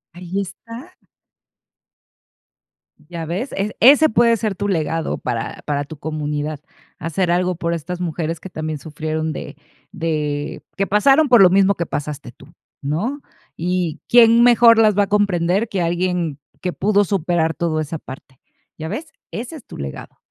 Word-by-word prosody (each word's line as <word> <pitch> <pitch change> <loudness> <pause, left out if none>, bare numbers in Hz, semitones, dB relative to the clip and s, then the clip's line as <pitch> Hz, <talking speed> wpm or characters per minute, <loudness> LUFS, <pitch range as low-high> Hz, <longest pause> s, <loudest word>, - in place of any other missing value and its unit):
Ahí 180 +2 -4
está. 230 +6 -8 2.1
¿Ya 170 -2 -5
ves? 190 - -3
Es 200 +2 -1
ese 285 +6 +7
puede 230 +1 +4
ser 215 -3 -2
tu 200 +2 -2
legado 165 -2 -1
para 115 -2 -4
para 145 -1 -1
tu 145 +2 -10
comunidad, 150 0 -3 0.4
hacer 170 +2 -1
algo 180 +1 +1
por 170 0 -2
estas 170 +2 -5
mujeres 165 -2 -3
que 190 - -9
también 155 -3 -4
sufrieron 155 +1 -3
de - - -8 0.3
de 150 -5 -3
que 195 0 0
pasaron 270 +9 +4
por 245 -4 +6
lo 185 - +8
mismo 195 +2 +4
que 170 - -2
pasaste 145 -2 -5
tú, - - -18 0.3
¿no? 205 - -2 0.4
Y 175 -1 -1
quién 235 0 +6
mejor 235 -1 +7
las 215 -3 +4
va 205 - +5
a - - -3
comprender 200 0 +1
que 195 -4 -2
alguien 175 -3 -1 0.2
que 180 - -1
pudo 205 0 +2
superar 175 -4 0
todo 165 -2 -1
esa 155 +2 -4
parte, 130 -1 -12 0.4
¿ya 160 - -5
ves? 310 - -5 0.2
Ese 245 +8 -6
es 260 - -15
tu - - -11
legado. 70 -1 -7
175 Hz, 160 wpm, -20 LUFS, 155-205 Hz, 2.1 s, lo